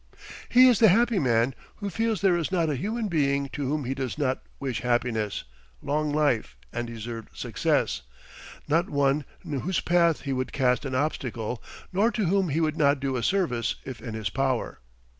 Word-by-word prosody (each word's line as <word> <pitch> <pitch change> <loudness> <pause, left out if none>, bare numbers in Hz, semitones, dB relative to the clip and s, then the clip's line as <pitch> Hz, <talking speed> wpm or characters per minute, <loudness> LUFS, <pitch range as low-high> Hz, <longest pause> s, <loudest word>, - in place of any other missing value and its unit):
He 255 +1 +8
is 245 -5 +4
the 225 - +7
happy 225 +2 +4
man 120 -2 +2 0.2
who 200 -2 -5
feels 225 +2 0
there 190 -3 +4
is 170 -1 -1
not 170 -4 +1
a - - -1
human 215 - -2
being 140 -5 +1
to 140 -2 -3
whom 150 -2 -1
he 130 - -1
does 130 -2 -4
not 135 -3 0 0.2
wish 130 -4 -3
happiness, 120 -4 0 0.4
long 150 +1 -1
life, 140 - +1 0.2
and 120 0 -3
deserved 115 -1 -7
success, - - 0 0.7
not 160 +4 +2
one 140 0 +1 0.2
in 145 -3 -2
whose 185 +5 -1
path 170 -2 +3
he 140 -1 -2
would 130 0 -2
cast 130 0 +2
an 130 -1 -3
obstacle 125 -5 -2 0.3
nor 205 +5 +3
to 215 -2 0
whom 190 0 +2
he 150 +3 0
would 155 -1 0
not 140 -1 +3
do 135 -1 -1
a 125 - -1
service 125 - 0
if 130 -2 -7
in 115 -3 -6
his 105 -3 -3
power. 130 -1 -1
140 Hz, 190 wpm, -26 LUFS, 125-175 Hz, 0.7 s, He